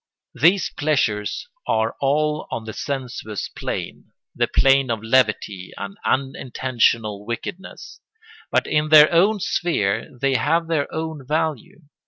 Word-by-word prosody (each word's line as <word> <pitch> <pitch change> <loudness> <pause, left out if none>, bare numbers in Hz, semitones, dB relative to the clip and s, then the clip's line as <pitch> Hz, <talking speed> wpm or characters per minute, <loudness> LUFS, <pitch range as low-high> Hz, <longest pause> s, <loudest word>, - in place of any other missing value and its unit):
These 175 +9 +3
pleasures 140 - -1 0.2
are 110 +1 +1
all 150 +2 0
on 115 - -4
the 110 - -6
sensuous 125 -6 -4
plane, - - -6 0.2
the - - +1
plane 135 -1 +3
of 115 -2 -2
levity 110 -6 +1
and 195 - -6
unintentional 120 -5 0
wickedness; 120 - -7 0.5
but - - +1
in 150 0 0
their 155 -1 +8
own 200 +5 +3
sphere 115 - -1
they 135 +1 +1
have 155 +7 +1
their 155 -4 -1
own 160 -3 -4
value. 155 -1 -2
135 Hz, 125 wpm, -22 LUFS, 115-155 Hz, 0.5 s, their